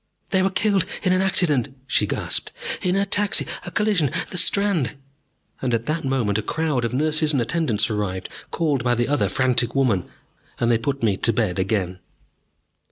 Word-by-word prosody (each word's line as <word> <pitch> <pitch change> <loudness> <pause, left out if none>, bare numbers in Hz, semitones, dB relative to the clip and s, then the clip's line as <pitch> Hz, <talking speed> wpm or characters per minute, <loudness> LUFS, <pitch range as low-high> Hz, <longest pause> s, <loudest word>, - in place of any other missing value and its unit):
"They 190 - +3
were 190 - +2
killed 195 -1 +1 0.2
in 185 -2 +3
an 185 - +2
accident," 145 -8 +1
she - - +1
gasped, - - -3 0.3
"in 180 0 +1
a 200 0 +2
taxi 205 0 +2 0.2
a - - -2
collision 195 -7 +1 0.2
the 180 - -3
Strand 195 - +2 0.3
!" - - -38
And 125 -3 +1
at 115 0 -3
that 155 +2 -1
moment 120 -6 0
a - - -1
crowd 150 +1 -1
of 115 - -2
nurses 155 +3 +2
and 140 - +2
attendants 120 -5 0
arrived, 100 -4 -3 0.2
called 150 -7 0
by 120 -1 +2
the 120 0 0
other 145 +1 +1
frantic 125 -2 +1
woman, 115 -10 +1 0.5
and 120 0 +2
they 115 - +3
put 140 +2 -3
me 100 -4 +2
to 115 - +2
bed 105 -6 0
again. 95 -2 -1
135 Hz, 185 wpm, -23 LUFS, 115-170 Hz, 0.5 s, They